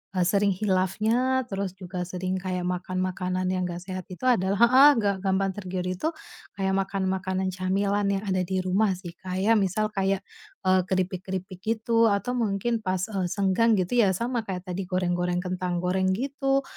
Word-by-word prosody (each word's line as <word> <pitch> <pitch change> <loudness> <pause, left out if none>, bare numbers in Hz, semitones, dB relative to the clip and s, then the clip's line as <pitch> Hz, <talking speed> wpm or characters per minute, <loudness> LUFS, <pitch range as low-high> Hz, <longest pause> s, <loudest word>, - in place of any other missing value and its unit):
eee, 180 - +3
sering 200 0 +3
khilafnya 215 +7 +1
terus 195 -1 -2
juga 180 -1 -5
sering 185 +1 -3
kayak 180 -1 -3
makan 180 0 -2
makanan 185 0 -2
yang 185 0 -1
enggak 175 0 -6
sehat 185 -1 -6
itu 185 +7 -10
adalah 200 -5 +2
heeh, 265 +4 +8
nggak 200 -2 +1
gampang 195 0 +1
tergiur 185 -2 -4
itu 185 - -1 0.5
kayak 190 -1 0
makan 195 0 -2
makanan 190 0 -1
camilan 200 +2 0
yang 200 +1 -1
ada 185 -1 +1
di 190 - -1
rumah 195 +2 +2
sih 175 -2 -8
kayak 190 +4 +1
misal, 210 +3 0
kayak, 195 0 0 0.4
eee, 185 0 +4
keripik-keripik 185 0 -3
gitu 230 +1 +2
atau 200 +5 0
mungkin 225 +1 0
pas, 185 -1 -1
eee, 190 -3 -1
senggang 200 +3 +2
gitu 210 +7 +1
ya 200 -4 +5
sama 235 +1 -1
kayak 180 -1 -4
tadi 185 +2 -3
goreng-goreng 180 -1 0
kentang 180 -1 -2
goreng 185 +1 +1
gitu, 275 +2 0
190 Hz, 170 wpm, -26 LUFS, 185-205 Hz, 0.5 s, heeh